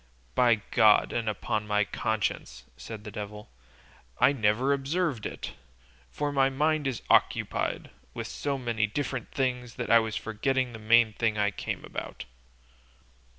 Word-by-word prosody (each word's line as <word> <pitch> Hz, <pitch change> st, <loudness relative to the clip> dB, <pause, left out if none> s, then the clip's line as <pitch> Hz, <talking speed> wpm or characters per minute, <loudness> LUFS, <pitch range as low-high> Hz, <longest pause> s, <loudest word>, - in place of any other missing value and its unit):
"By 120 Hz, -4 st, +3 dB
God 110 Hz, -2 st, +5 dB
and 115 Hz, -2 st, -1 dB
upon 105 Hz, +1 st, -2 dB
my 105 Hz, 0 st, +2 dB
conscience," 95 Hz, -, -2 dB
said 105 Hz, -, -8 dB
the 105 Hz, -, -8 dB
devil, 105 Hz, -4 st, -7 dB, 0.7 s
"I 140 Hz, -, +5 dB
never 120 Hz, +3 st, +2 dB
observed 140 Hz, -2 st, -1 dB
it, -, -, -7 dB, 0.6 s
for 145 Hz, 0 st, -2 dB
my 135 Hz, -1 st, +3 dB
mind 150 Hz, +2 st, +1 dB
is 130 Hz, -4 st, -3 dB
occupied -, -, +1 dB, 0.2 s
with -, -, -4 dB
so 140 Hz, -1 st, -3 dB
many 115 Hz, -4 st, 0 dB
different 130 Hz, +2 st, -3 dB
things 125 Hz, -3 st, -2 dB
that 120 Hz, -3 st, -3 dB
I 115 Hz, -, +8 dB
was 110 Hz, -1 st, -3 dB
forgetting 130 Hz, +4 st, -1 dB
the 110 Hz, -, -8 dB
main 110 Hz, 0 st, +4 dB
thing 110 Hz, -1 st, 0 dB
I 105 Hz, -1 st, +2 dB
came -, -, -5 dB
about." -, -, -7 dB
115 Hz, 150 wpm, -28 LUFS, 105-135 Hz, 0.7 s, I